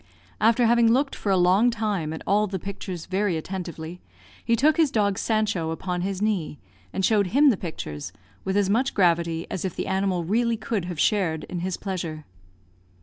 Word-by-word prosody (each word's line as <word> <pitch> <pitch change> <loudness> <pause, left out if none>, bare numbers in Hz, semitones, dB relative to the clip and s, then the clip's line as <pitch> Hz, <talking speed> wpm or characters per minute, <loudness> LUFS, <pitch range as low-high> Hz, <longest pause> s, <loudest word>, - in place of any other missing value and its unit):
After 230 +3 +4
having 230 0 +4
looked 275 +3 +2
for 200 - -2
a 190 - +4
long 185 +7 +4
time 210 -9 -2
at 160 - -6
all 210 +2 +2
the 190 -1 -3
pictures 185 -2 -6
very 190 -2 0
attentively, 175 -1 -6 0.4
he 230 - +2
took 300 +8 +3
his 320 -3 +4
dog 205 -5 +1
Sancho 215 -7 0
upon 180 +2 -3
his 195 +1 -2
knee, 190 -8 -1 0.3
and 190 - 0
showed 205 -2 +3
him 280 +8 +5
the - - +1
pictures, 75 - -6 0.3
with 190 +1 -1
as 200 -2 +3
much 240 +7 +1
gravity 170 -3 +2
as 185 - -3
if 185 -3 -3
the - - -3
animal 190 -2 0
really 230 +6 +1
could 215 -4 -2
have 175 -3 -5
shared 170 -6 +1
in 180 - -5
his 180 +1 -2
pleasure. 170 -6 -5
190 Hz, 190 wpm, -25 LUFS, 175-220 Hz, 0.4 s, him